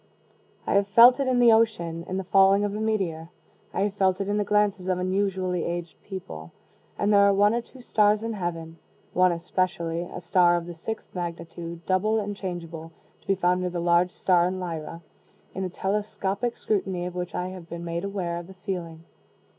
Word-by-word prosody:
I - - 0
have 200 0 +3
felt 240 +5 +7
it 275 - 0
in 255 -1 +2
the 240 -1 +6
ocean 175 -7 +1
in 185 - -3
the 190 - -2
falling 195 +2 +4
of 205 -1 -1
a - - -3
meteor. 185 -7 -1 0.4
I - - -2
have 200 0 0
felt 190 -2 +1
it 195 - -2
in 205 +1 0
the 210 - +1
glances 205 -2 +1
of 185 -1 +1
unusually 185 -1 -1
aged 170 -1 -5
people. 80 - -8 0.4
And 205 +1 +2
there 200 - +6
are 200 0 +5
one 205 +2 +4
or 235 - 0
two 250 +1 -16
stars 210 -1 +3
in 230 0 -2
heaven 165 -4 -5 0.3
(one 185 0 +4
especially, 170 -1 -1
a 175 +1 -7
star 175 0 +3
of 170 - -4
the 175 - -7
sixth 215 +7 -7
magnitude, 170 -1 -6
double 205 +4 +2
and 205 -1 -4
changeable, 170 -4 -6 0.3
to - - -28
be 195 - +3
found 180 0 +1
near 180 - -1
the 175 0 -4
large 170 +1 +3
star 180 -1 +2
in 185 +1 -3
Lyra) 165 -1 -6 0.5
in 190 - -3
a - - -3
telescopic 200 +4 -2
scrutiny 190 -4 -1
of 180 - -5
which 180 -1 -5
I 180 +1 -2
have 180 -2 -10
been 170 0 -6
made 170 +1 -3
aware 190 -4 -3
of 170 0 -7
the 190 - -13
feeling. 175 -4 -5
185 Hz, 205 wpm, -26 LUFS, 170-200 Hz, 0.5 s, felt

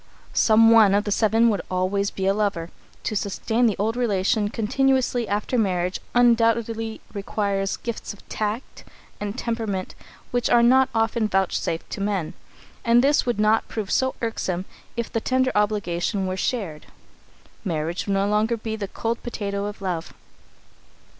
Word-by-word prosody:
Some 225 0 +5
one 215 -4 +6
of 205 - +2
the 205 - -3
seven 225 +2 +3
would 205 -4 0
always 185 +2 0
be 190 - -4
a 195 - +3
lover. 200 -5 -1 0.3
To 215 - -2
sustain 220 +4 0
the 215 - +1
old 220 +3 0
relation 210 -2 +1
continuously 250 +1 +1
after 210 +5 0
marriage 180 -3 0 0.2
undoubtedly 230 -2 +2
requires 200 -1 -1
gifts 235 -1 -5
of 205 - -14
tact 215 +4 -4 0.4
and 205 +2 -4
temperament 225 -6 -3 0.4
which 245 -1 0
are 235 0 +5
not 260 +2 +5
often 225 0 +1
vouchsafed 190 -4 -1
to 200 - -4
men, 200 -5 -1 0.5
and 235 +1 +4
this 285 -1 +3
would 240 -4 0
not 215 +1 +3
prove 215 -4 -4
so 260 0 +1
irksome 190 -5 -2 0.3
if 235 - -3
the 225 - 0
tender 260 +1 +1
obligation 205 -2 0
were 185 0 -2
shared. 190 -7 -3 0.8
Marriage 170 -1 -2
would 200 - +1
no 195 +1 +1
longer 215 +3 +1
be 220 0 -4
the 205 -2 -4
cold 230 +4 -3
potato 200 -4 -3
of 205 -1 -6
love. 175 -3 -3
210 Hz, 155 wpm, -24 LUFS, 195-230 Hz, 0.8 s, one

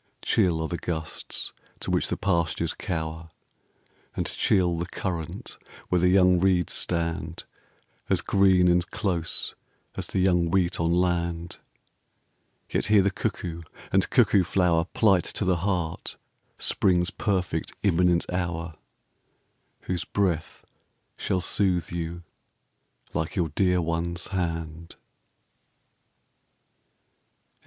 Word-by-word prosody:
Chill 85 -3 +2
are - - -1
the 85 - -4
gusts 80 -2 -4 0.3
to - - -4
which - - +1
the - - -1
pastures 85 -3 0
cower, 80 -2 -4 0.9
And - - -1
chill 90 -3 +1
the 85 - -2
current 85 -4 -5 0.3
where 90 -1 +2
the 90 - +4
young 90 -1 +5
reeds 90 -3 +2
stand 85 -1 -2 0.7
As - - +2
green 95 -2 +4
and 90 0 +2
close 85 -5 -1 0.4
as - - -4
the - - -4
young 90 -2 +3
wheat 90 -1 +1
on 85 0 +1
land 85 -1 0 1.1
Yet - - -1
here 105 -2 +5
the 100 - +2
cuckoo 90 -5 -3 0.3
and - - +2
cuckoo 95 - +4
flower 90 -3 +2
Plight 95 -2 +3
to 100 - -1
the 90 -1 +2
heart 90 -3 -2 0.4
Spring's 90 -1 +1
perfect 90 -5 -1
imminent 90 -2 +3
hour 85 -2 -2 1.1
Whose 90 -1 -2
breath 90 -6 -1 0.5
shall 90 - -1
soothe 90 -3 +1
you 85 0 -4 0.9
like 80 0 -2
your 85 -4 +1
dear 90 +3 +2
one's 85 +1 -2
hand. 85 -3 -3
85 Hz, 115 wpm, -26 LUFS, 85-95 Hz, 1.1 s, young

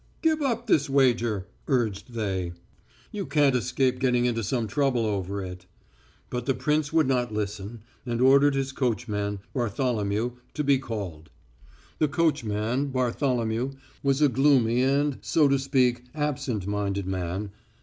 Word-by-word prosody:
"Give 315 -1 +2
up 240 -4 0
this 150 -10 +2
wager," 120 -7 +2 0.2
urged 120 -4 -1
they, 95 -6 -2 0.6
"you 205 -2 -4
can't 145 -4 +3
escape 125 +1 +1
getting 125 -2 +2
into 115 -2 0
some 115 +3 -1
trouble 125 0 +1
over 100 -1 -2
it." 90 -1 -8 0.6
But 125 -1 -3
the 135 - +2
prince 150 0 0
would 160 -1 +3
not 125 -3 +1
listen, 105 +1 -4 0.2
and 120 -2 -3
ordered 140 +2 +5
his 135 0 -1
coachman, 105 -6 -2
Bartholomew, 115 -2 -1 0.2
to 150 - -1
be 140 -2 +3
called. 95 - -6 0.7
The 155 - +3
coachman, 135 -5 0
Bartholomew, 125 -1 0 0.3
was 140 +1 +2
a - - +7
gloomy 130 -3 +3
and, 140 +1 +1
so 155 -3 +3
to 140 0 +2
speak, 130 -3 +1
absent 135 -9 -2
minded 100 -1 -2
man. 95 +2 -3
125 Hz, 140 wpm, -26 LUFS, 105-140 Hz, 0.7 s, a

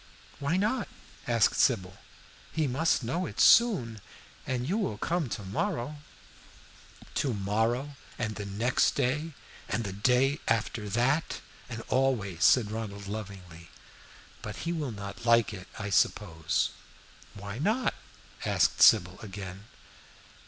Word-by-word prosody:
"Why 145 +5 0
not?" 215 +3 0 0.4
asked 115 -3 +3
Sybil. 100 -6 +2 0.5
"He 160 -1 0
must 140 +2 +1
know 170 +10 -1
it - - -8
soon, 125 - +5 0.5
and 125 -1 -2
you 185 - 0
will 110 - -2
come 165 +3 -1
to 105 - -4
morrow." 120 +8 -2 1.2
"To 130 -5 0
morrow, 115 +8 0 0.2
and 110 -2 -2
the 105 -1 -6
next 110 +6 +1
day, 150 +6 0 0.4
and 115 - -1
the 100 -3 -4
day 125 +8 +2
after 110 -1 0
that, 130 +9 +1 0.3
and 115 -2 -5
always," 110 -10 +1
said 110 -5 +5
Ronald, 105 -2 -5
lovingly. 95 -5 -8 0.7
"But 105 -2 -6
he 170 - 0
will 155 -5 -2
not 100 0 -8
like 115 -2 +4
it, 90 -3 -9
I 100 -1 -4
suppose." 80 -5 +1 0.6
"Why 100 +3 -7
not?" 220 - +1 0.5
asked - - +2
Sybil, 95 -4 +6
again. 95 -1 -8
115 Hz, 130 wpm, -29 LUFS, 100-135 Hz, 1.2 s, Sybil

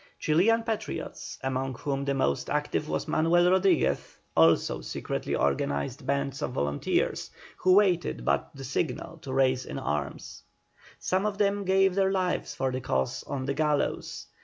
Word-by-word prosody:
Chilian 210 +9 +3
patriots, 225 -2 -4
among 130 0 -2
whom 140 +1 -3
the 140 0 0
most 135 - 0
active 150 +1 -1
was - - -2
Manuel 170 +3 +3
Rodriguez, 190 -3 +2 0.2
also 80 +1 +4
secretly - - -3
organised 70 - -1
bands 140 -1 -1
of 125 - -2
volunteers, 70 - -1 0.3
who 185 0 +4
waited 185 -4 +2
but - - +1
the 135 - -8
signal 150 +5 -3
to 135 - -7
rise 130 -1 +2
in - - -6
arms. 75 +1 -4 0.6
Some 190 +3 0
of 205 -1 -3
them 200 -1 +1
gave 190 0 +4
their 195 0 +2
lives 185 -2 -1
for 130 -1 -1
the 130 0 -3
cause 65 - -1
on 135 -2 -4
the 140 - -1
gallows. 150 0 -1
145 Hz, 155 wpm, -28 LUFS, 130-185 Hz, 0.6 s, also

